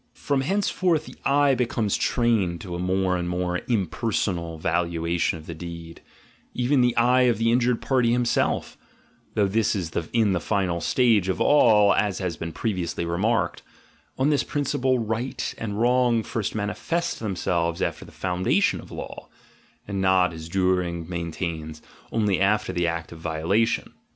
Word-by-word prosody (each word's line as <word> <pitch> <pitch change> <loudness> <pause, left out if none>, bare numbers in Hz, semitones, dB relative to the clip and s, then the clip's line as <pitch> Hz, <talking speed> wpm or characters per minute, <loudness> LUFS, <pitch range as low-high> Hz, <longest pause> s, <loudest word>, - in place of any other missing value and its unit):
From 140 -2 -1
henceforth 180 -1 +1
the - - -11
eye 140 0 +4
be 125 -2 +1
comes 110 -4 0
trained 110 -8 +1
to 90 - -7
a 85 - -4
more 95 0 +1
and 90 -1 -2
more 90 0 -1
impersonal 95 -5 -1
valuation 85 0 0
of 80 - -12
the 85 - -6
deed, 85 0 -9 0.5
even 125 +2 +2
the 125 -1 +2
eye 125 +1 +4
of 120 - +1
the 115 +1 +2
injured 120 0 +1
party 125 -3 +2
himself 120 0 0 0.6
(though 105 -2 +3
this 110 +2 +1
is 85 -5 -3 0.2
in 110 -4 +2
the 90 - +1
final 90 -1 -1
stage 110 -1 +3
of 95 - -1
all, 110 -8 +5
as 100 -1 0
has 90 -3 -3
been 85 +2 -5
pre 110 +7 -2
viously 85 -2 -3
remarked) 100 +6 0 0.3
— - - -36
on 135 +3 +2
this 145 - +2
principle 130 -2 0
"right" 120 +3 -3
and 105 -2 -4
"wrong" 120 -1 +3
first 110 -2 -3
manifest 165 +11 -2
themselves 85 -5 -1
after - - -2
the - - -14
foundation 90 0 0
of - - -14
law - - -8 0.6
(and 100 -1 -2
not, 95 -2 +3
as 80 0 -8
Duhring 90 -3 0
maintains, 85 -2 -4 0.3
only 105 -4 +1
after 105 +2 +2
the 85 -1 0
act 85 0 -3
of 85 - -10
violation). 85 +8 0
100 Hz, 165 wpm, -24 LUFS, 85-120 Hz, 0.6 s, all